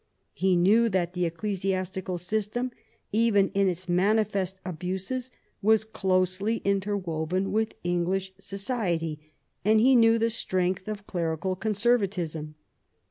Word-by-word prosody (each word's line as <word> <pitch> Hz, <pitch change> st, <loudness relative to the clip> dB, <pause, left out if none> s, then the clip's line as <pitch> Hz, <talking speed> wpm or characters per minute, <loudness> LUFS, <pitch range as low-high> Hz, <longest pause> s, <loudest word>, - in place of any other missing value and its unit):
He 185 Hz, +3 st, +2 dB
knew 215 Hz, +7 st, +4 dB
that 180 Hz, -3 st, 0 dB
the 180 Hz, -1 st, 0 dB
ecclesiastical 185 Hz, 0 st, -2 dB
system, 215 Hz, +7 st, -2 dB, 0.4 s
even 210 Hz, -3 st, +3 dB
in 195 Hz, -1 st, +2 dB
its 180 Hz, +1 st, -5 dB
manifest 190 Hz, 0 st, +1 dB
abuses, 190 Hz, +8 st, -3 dB, 0.3 s
was 220 Hz, +1 st, +4 dB
closely 190 Hz, +1 st, 0 dB
interwoven 190 Hz, -3 st, -1 dB
with 220 Hz, +1 st, 0 dB
English 180 Hz, +2 st, -1 dB
society, 195 Hz, -, -2 dB, 0.4 s
and 215 Hz, +3 st, +4 dB
he 260 Hz, +4 st, +5 dB
knew 230 Hz, -1 st, +6 dB
the 230 Hz, 0 st, +1 dB
strength 185 Hz, -3 st, -1 dB
of 205 Hz, -1 st, -5 dB
clerical 170 Hz, 0 st, -2 dB
conservatism. 195 Hz, -8 st, 0 dB
190 Hz, 115 wpm, -27 LUFS, 180-215 Hz, 0.4 s, knew